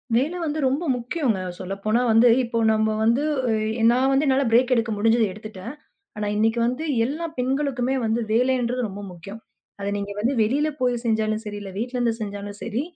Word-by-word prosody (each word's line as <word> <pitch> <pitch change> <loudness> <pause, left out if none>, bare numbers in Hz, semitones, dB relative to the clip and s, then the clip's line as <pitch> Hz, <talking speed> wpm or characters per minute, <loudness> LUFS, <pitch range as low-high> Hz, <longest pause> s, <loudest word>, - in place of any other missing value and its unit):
வேல 285 +9 +1
வந்து 310 -1 -2
ரொம்ப 270 +6 +1
முக்கியோங்க 245 - -1 0.2
சொல்லப்போனா 200 +5 -1
வந்து 225 +2 +6 0.2
இப்போ 235 -1 -3 0.2
நம்ம 220 0 +1
வந்து 235 +6 +3 0.7
நான் 255 +2 +2
வந்து 275 +3 +2
என்னால 270 +1 +3
பிரேக் 250 +2 +4
எடுக்க 230 -1 0
முடிஞ்சது 225 +2 +3
எடுத்துட்டேன். 215 +3 -8 0.4
ஆனா 210 0 -2
இன்னைக்கு 225 +2 +2
வந்து 250 +6 -2 0.2
எல்லா 305 +7 -3
பெண்களுக்கும் 260 -1 0 0.2
வந்து 225 +2 0
வேலைன்றது 250 +1 +1
ரொம்ப 200 +1 -8
முக்கியம். 195 +6 -10 0.4
அத 200 - -4
நீங்க 200 0 -4
வந்து 235 +6 +1
வெளியில 285 +8 +1
போய் 245 -2 0
செஞ்சாலும் 220 -1 0
சரி 205 -1 -5
இல்ல 195 - -7
வீட்டிலருந்து 240 0 -1
செஞ்சாலும் 205 -1 -6
சரி 230 +3 -2
235 Hz, 165 wpm, -23 LUFS, 215-255 Hz, 0.7 s, வந்து